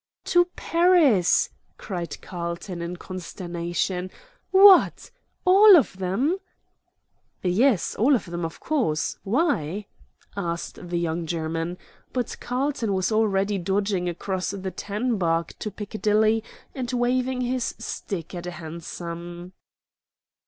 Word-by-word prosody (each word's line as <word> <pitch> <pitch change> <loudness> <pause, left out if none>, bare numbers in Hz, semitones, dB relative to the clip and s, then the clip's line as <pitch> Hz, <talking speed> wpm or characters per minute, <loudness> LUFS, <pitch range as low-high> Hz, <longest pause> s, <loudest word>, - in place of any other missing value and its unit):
"To 350 -1 +4
Paris!" 330 - +4 0.3
cried 175 -4 -5
Carlton, 170 0 -5
in 170 +1 -4
consternation. 180 0 -4 0.4
"What! 390 +4 +6 0.3
all 390 +1 +9
of 275 - +1
them?" 240 - 0 1.0
"Yes, 200 +4 +2
all 265 +6 +4
of 240 - -2
them, 175 -1 -5
of 165 0 -5
course. 235 - -1
Why?" 200 - 0 0.5
asked 175 -1 -4
the 175 - -1
young 170 0 -2
German. 165 +1 -2 0.4
But 250 -3 -2
Carlton 250 -4 -1
was 190 +3 0
already 205 -2 +1
dodging 190 0 0
across 185 +2 -3
the 190 -1 -4
tan 215 +4 -2
bark 165 -2 0
to 215 - -3
Piccadilly 215 +1 +1 0.3
and 255 -2 -4
waving 255 +1 0
his 250 0 -1
stick 195 -6 -5
at 175 -1 -6
a - - -3
hansom. 170 +2 -7
195 Hz, 115 wpm, -25 LUFS, 175-245 Hz, 1.0 s, all